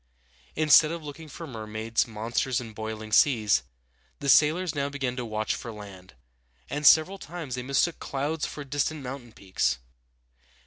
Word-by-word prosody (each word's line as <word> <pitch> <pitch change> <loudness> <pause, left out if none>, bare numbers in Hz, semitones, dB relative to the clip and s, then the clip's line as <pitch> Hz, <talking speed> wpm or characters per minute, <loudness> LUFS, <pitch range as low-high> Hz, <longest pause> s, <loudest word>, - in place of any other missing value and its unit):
Instead 155 0 +6
of 170 -1 -5
looking 150 +2 -9
for 165 +4 -8
mermaids, 110 -2 -2
monsters, 120 +3 -1
and 115 -3 -8
boiling 110 0 -6
seas, 110 - +4 0.6
the 140 - -3
sailors 160 +5 +4
now 140 -1 -1
began 135 -3 -3
to 125 - -3
watch 110 -1 -2
for 115 - -6
land, 100 - -11 0.6
and 145 0 +2
several 185 +5 +6
times 160 -5 -7
they 125 - -2
mistook 140 +6 +1
clouds 145 +3 -2
for 145 - -7
distant 145 +2 -2
mountain 125 -2 -7
peaks. 95 - -1
130 Hz, 150 wpm, -27 LUFS, 110-150 Hz, 0.6 s, Instead